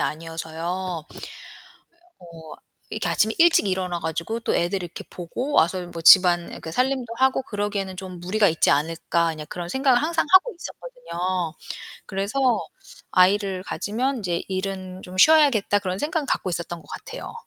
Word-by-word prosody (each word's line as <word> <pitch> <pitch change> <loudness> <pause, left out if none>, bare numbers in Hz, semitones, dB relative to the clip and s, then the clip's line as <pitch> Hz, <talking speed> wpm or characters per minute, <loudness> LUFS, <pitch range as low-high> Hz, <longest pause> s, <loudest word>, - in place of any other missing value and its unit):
아니어서요. 165 +2 -4
예. - - -10 1.0
'어 180 - -15 0.6
이렇게 - - -3
아침에 - - +2
일찍 335 -9 +5
일어나 185 -2 -1
가지고 170 +8 -3
또 - - -1
애들 180 +2 0
이렇게 175 -1 -8
보고 245 - -5
와서 185 - +3
좀 175 0 -8
뭐 165 -1 -6
집안 175 -1 +6
그 160 - -7
살림도 255 0 -1
하고 265 0 +3
그러기에는 205 -4 -3
좀 185 -1 -8
무리가 205 +4 +2
있지 160 - +2
않을까?' 165 +2 +1
그냥 155 -1 -7
그런 175 -1 -6
생각을 265 +1 +3
항상 325 0 0
하고 405 +6 +6
있었거든요. 185 - -4 0.5
그래서 200 +7 -3 0.7
'아이를 190 0 +3
가지면 250 +8 -2
인제 175 -5 -2
일은 190 -1 -4
좀 185 +1 -9
쉬어야겠다.' 275 -7 +5
그런 185 -2 -3
생각은 310 0 -1
갖고 190 - -1
있었던 170 -1 -4
것 - - -21
같아요. - - -8
185 Hz, 355 characters per minute, -23 LUFS, 175-235 Hz, 1.0 s, 집안